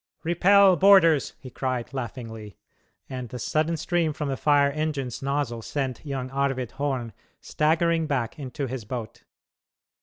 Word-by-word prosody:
"Repel 190 +3 +5
boarders!" 185 -7 +5
he 130 - -11
cried, 130 -1 -3
laughingly, 115 -5 -7 0.5
and 125 -2 -6
the 125 - -6
sudden 155 +7 0
stream 165 0 0
from 150 -1 -4
the 135 - -1
fire 145 0 +3
engine's 145 -5 -3
nozzle 135 -4 -2
sent 130 0 -4
young 135 -3 -4
Arvid 135 -3 -1
Horn 135 -5 -3 0.3
staggering 165 +1 +1
back 135 -3 -2
into 135 0 -4
his 130 -2 -5
boat. 115 0 -7
140 Hz, 140 wpm, -25 LUFS, 125-155 Hz, 0.5 s, Repel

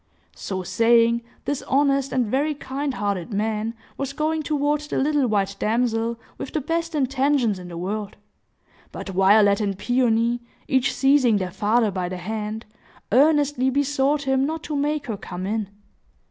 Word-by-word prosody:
So 190 -1 -4
saying, 230 +3 +3 0.2
this 285 -1 -1
honest 275 0 +2
and 255 -2 +1
very 285 +7 0
kind 275 0 -4
hearted 200 -1 -2
man 215 +2 -1 0.2
was 275 0 -3
going 310 +2 -1
toward 295 0 0
the 300 - -4
little 290 -1 +2
white 200 -2 0
damsel, 230 0 0 0.2
with - - -6
the 310 - +1
best 330 +3 -2
intentions 265 -6 +1
in 180 - -9
the 170 -1 -8
world. 205 +3 -4 0.8
But - - -7
Violet 200 +2 +4
and 200 -2 -1
Peony, 240 0 +1 0.3
each 265 0 +2
seizing 270 -5 +3
their 185 -2 -3
father 215 +3 +2
by 185 -2 -3
the 185 - -5
hand, 215 +3 -4 0.5
earnestly 285 0 +3
besought 285 +1 +1
him 265 -1 +1
not 315 +2 -2
to 305 - -4
make 290 0 -1
her 225 -6 -4
come 180 -1 -6
in. 210 0 -2
245 Hz, 160 wpm, -23 LUFS, 210-280 Hz, 0.8 s, Violet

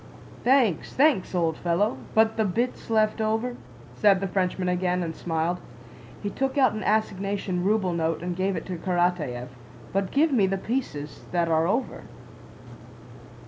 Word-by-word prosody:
"Thanks, 245 - +2
thanks, 270 -10 +3
old 165 -3 +1
fellow.... 180 +6 0 0.2
But 220 0 +4
the 220 - +1
bits 230 +7 -2
left 220 0 +2
over?" 225 +3 0 0.4
said 195 +9 +4
the 195 - -2
Frenchman 185 0 -1
again 180 0 0
and 165 -1 -4
smiled. 165 +1 -1 0.6
He 205 - -2
took 270 +1 -2
out 260 -5 +4
an 215 - -4
assignation 200 -3 0
ruble 195 -2 +1
note 165 -1 -1
and 175 0 -3
gave 190 +1 0
it 165 - -4
to 185 -2 -4
Karatáev. 170 -8 -1 0.4
"But 195 -1 0
give 310 +3 +3
me 215 -8 +3
the 195 +1 0
pieces 190 - -4
that 170 -1 +1
are 160 0 +3
over." 230 +8 -2
190 Hz, 155 wpm, -26 LUFS, 175-220 Hz, 0.6 s, But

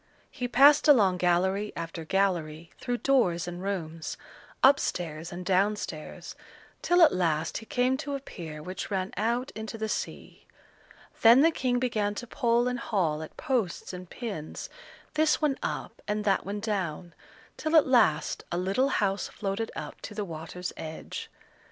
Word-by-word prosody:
He 250 -3 -3
passed 280 +5 +6
along 205 -11 +6
gallery 190 +4 +1
after 165 0 -5
gallery 170 -4 0
through 245 -1 -2
doors 180 -12 +3
and 175 0 -6
rooms, 165 -5 -4 0.5
up 275 +1 +7
stairs 160 -1 -3
and 180 +1 -7
down 195 +3 +3
stairs, 155 -6 -7 0.5
till 350 0 +5
at 310 - +6
last 165 -3 0
he 225 - -13
came 260 -1 +1
to 285 -1 -4
a - - -3
pier 160 - -8
which 185 +3 -5
ran 190 -2 -2
out 235 +5 0
into 220 +1 -6
the 220 0 -2
sea. - - -5 0.7
Then 235 +4 +8
the 325 +2 +5
King 250 -5 0
began 215 -5 0
to 245 - -5
pull 240 -1 +1
and 250 -1 -1
haul 170 -10 0
at 160 - -9
posts 230 -10 -1
and 180 -1 -8
pins, 200 -11 -6 0.4
this 310 0 +3
one 295 -3 +1
up - - -4
and 210 0 -1
that 195 -2 +1
one 205 +1 -3
down, 180 -6 -3 0.4
till 315 +1 -1
at 315 - +7
last 160 - +2
a 175 - -1
little 195 +9 +1
house 200 -5 0
floated 205 +2 -3
up - - -7
to 210 - -8
the 210 -1 -2
water's 170 +1 -6
edge. 160 0 -7
200 Hz, 165 wpm, -28 LUFS, 175-245 Hz, 0.7 s, Then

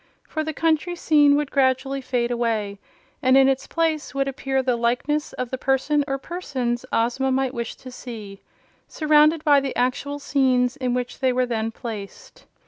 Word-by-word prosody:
For 315 - -3
the 315 - -3
country 325 +3 0
scene 295 -4 +4
would 295 -1 -1
gradually 270 0 +1
fade 245 -2 -1
away 220 -4 -1 0.4
and 260 -1 +5
in 270 0 +6
its 270 0 0
place 315 -5 -1
would 275 0 0
appear 270 0 -1
the 250 -1 +1
likeness 245 +6 -1
of 255 -1 -4
the 260 - -3
person 270 +3 +1
or 270 -1 -1
persons 265 -7 -4
Ozma 245 +4 +1
might 265 0 0
wish 235 -2 -4
to 255 - -11
see, 215 -6 -9 0.5
surrounded 305 0 +3
by 290 -2 +5
the 275 -1 -4
actual 280 +3 -1
scenes 260 -3 +1
in 255 -3 -1
which 250 0 -4
they 260 -1 +2
were 250 0 +1
then 225 -2 -2
placed. 225 - -9
265 Hz, 175 wpm, -23 LUFS, 245-290 Hz, 0.5 s, in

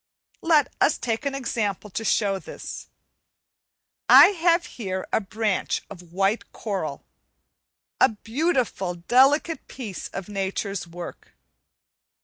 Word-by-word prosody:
Let 315 -4 +3
us 300 - +4
take 230 +3 -2
an 275 - -2
example 210 -6 -2
to 225 - -3
show 200 -3 +1
this. - - -8 1.2
I - - +10
have 340 -2 +2
here 190 -5 -5
a - - +3
branch 210 0 -1
of 175 -2 -12
white 195 +5 0
coral, 185 -10 -4 0.9
a - - +6
beautiful, 225 - -1
delicate 270 - +3
piece 220 -8 -7
of 195 - -7
nature's 195 -1 -3
work. 170 +1 -9
215 Hz, 115 wpm, -24 LUFS, 190-270 Hz, 1.2 s, I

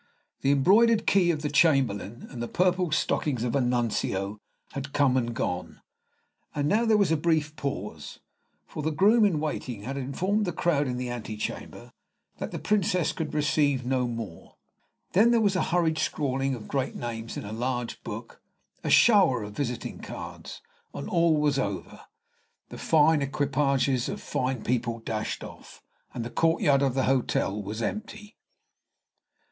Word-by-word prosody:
The 135 - +1
embroidered 210 +11 +4
key 185 -3 +4
of 155 -3 0
the 150 - -1
Chamberlain 135 - +2
and 120 - -6
the 120 - -2
purple 180 +1 +1
stockings 145 -4 0
of 120 0 -1
a 140 - +3
Nuncio 110 -5 -1 0.3
had 140 0 -6
come 140 -3 +3
and 120 -2 0
gone; 100 -7 -3 0.8
and 145 -1 0
now 220 +7 +2
there 220 -2 +4
was 200 -6 +2
a - - +4
Brief 155 -1 0
pause, 105 - -5 0.5
for - - -7
the 155 - 0
groom 205 +9 +4
in 175 -7 +2
waiting 130 -8 -4
had 135 +4 -4
informed 185 +11 -1
the 175 - -2
crowd 155 -4 +1
in 125 -1 -2
the 125 -1 -3
antechamber 110 -3 -6 0.5
that - - -3
the - - -5
Princess 195 -4 +1
could 160 -3 -4
receive 145 -3 +1
no 130 -1 +1
more. 115 -8 -7 0.6
Then 215 +6 +5
there 235 -1 +4
was 200 -3 +2
a 185 - +1
hurried 165 -3 +1
scrawling 135 -3 -1
of 110 - -10
great 135 -2 -2
names 115 -1 -5
in - - -5
a 105 - -6
large 120 +1 -3
book, - - -8 0.4
a - - -2
shower 190 - +5
of 105 0 -7
visiting 125 -4 -4
cards, - - -8 0.3
and - - -5
all 165 -2 +3
was 145 -2 +2
over; - - -4 0.7
the - - -9
fine 155 -1 +4
equipages 140 -2 +1
of - - -4
fine 130 -2 -2
people 120 -1 -1
dashed 110 -1 -4
off, - - -12 0.3
and 115 - -5
the 120 - -6
courtyard 165 -4 +3
of 135 -2 +1
the 135 - +2
hotel 125 -6 0
was 105 +3 -5
empty. 210 - -5
140 Hz, 165 wpm, -27 LUFS, 120-165 Hz, 0.8 s, Then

